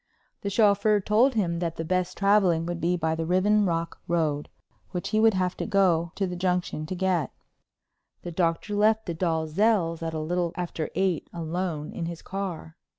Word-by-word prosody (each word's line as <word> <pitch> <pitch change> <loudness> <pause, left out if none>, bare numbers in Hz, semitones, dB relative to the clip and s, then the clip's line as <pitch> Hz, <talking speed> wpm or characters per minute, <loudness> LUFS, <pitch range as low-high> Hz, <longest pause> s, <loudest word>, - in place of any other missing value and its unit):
The 200 - -2
chauffeur 205 0 +3
told 225 +6 +3
him 170 -6 0
that 170 -2 -2
the 165 - -4
best 185 +1 -1
traveling 195 -5 +3
would 175 0 -4
be 175 +1 +1
by 160 -1 0
the 160 0 -2
Riven 200 +3 +3
Rock 165 -1 -2
Road, 155 -4 0 0.4
which 180 - -4
he 215 - +1
would 220 -2 +5
have 185 -1 0
to - - -3
go 180 -5 +2
to 195 - 0
the 180 -1 -4
Junction 180 -3 -1
to 185 - -4
get. 180 -5 0 0.9
The 175 - -5
Doctor 170 +4 0
left 220 +2 +3
the 170 - -3
Dalzells' 165 +2 +1
at 165 -1 -3
a - - -2
little 170 +2 -1
after 170 -3 -3
eight, 190 -5 0
alone 165 -2 -3
in 165 - -4
his 170 -1 -7
car. 185 -4 -5
180 Hz, 185 wpm, -26 LUFS, 165-195 Hz, 0.9 s, would